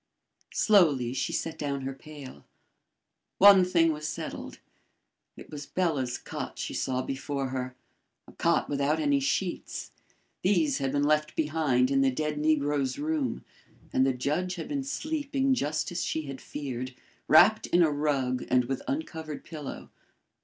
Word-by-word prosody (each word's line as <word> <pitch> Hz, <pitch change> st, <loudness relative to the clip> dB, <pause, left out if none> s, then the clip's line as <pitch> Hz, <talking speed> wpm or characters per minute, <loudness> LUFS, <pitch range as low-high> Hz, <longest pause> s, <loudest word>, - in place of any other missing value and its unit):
Slowly 150 Hz, -, +4 dB
she 135 Hz, -, -1 dB
set 165 Hz, -, -3 dB
down 140 Hz, -2 st, -2 dB
her 135 Hz, +1 st, -4 dB
pail. 140 Hz, -1 st, -11 dB, 0.9 s
One 195 Hz, -1 st, +8 dB
thing 170 Hz, -3 st, +3 dB
was 155 Hz, 0 st, -5 dB
settled. 155 Hz, -, -6 dB, 0.8 s
It -, -, -12 dB
was 145 Hz, -1 st, -7 dB
Bela's 145 Hz, -9 st, 0 dB
cot -, -, -6 dB
she -, -, -4 dB
saw 130 Hz, -1 st, -1 dB
before 135 Hz, 0 st, -3 dB
her 130 Hz, -1 st, -4 dB, 0.5 s
a -, -, -13 dB
cot -, -, +1 dB
without 145 Hz, +2 st, 0 dB
any 145 Hz, -2 st, +2 dB
sheets. 155 Hz, +7 st, -2 dB, 0.5 s
These 165 Hz, -7 st, +2 dB
had 135 Hz, -1 st, -1 dB
been 145 Hz, 0 st, +1 dB
left 155 Hz, +1 st, +1 dB
behind 150 Hz, -5 st, +1 dB
in 135 Hz, 0 st, +3 dB
the 135 Hz, -, +4 dB
dead 150 Hz, +3 st, -2 dB
negro's 145 Hz, -3 st, +1 dB
room, 300 Hz, -2 st, -2 dB, 0.5 s
and 130 Hz, -, +4 dB
the 135 Hz, -, +3 dB
judge 150 Hz, +8 st, -1 dB
had 170 Hz, -, -6 dB
been 280 Hz, -2 st, -2 dB
sleeping 275 Hz, -1 st, -1 dB
just 155 Hz, -, -1 dB
as 175 Hz, -, -2 dB
she 160 Hz, -, -2 dB
had 135 Hz, -2 st, -7 dB
feared, 130 Hz, -3 st, -5 dB, 0.3 s
wrapped 190 Hz, +8 st, +6 dB
in 175 Hz, 0 st, +4 dB
a 155 Hz, -, +3 dB
rug 140 Hz, -4 st, 0 dB
and 125 Hz, -1 st, +3 dB
with 135 Hz, +2 st, -3 dB
uncovered 160 Hz, -, -4 dB
pillow. 150 Hz, -4 st, -8 dB
150 Hz, 155 wpm, -28 LUFS, 135-175 Hz, 0.9 s, One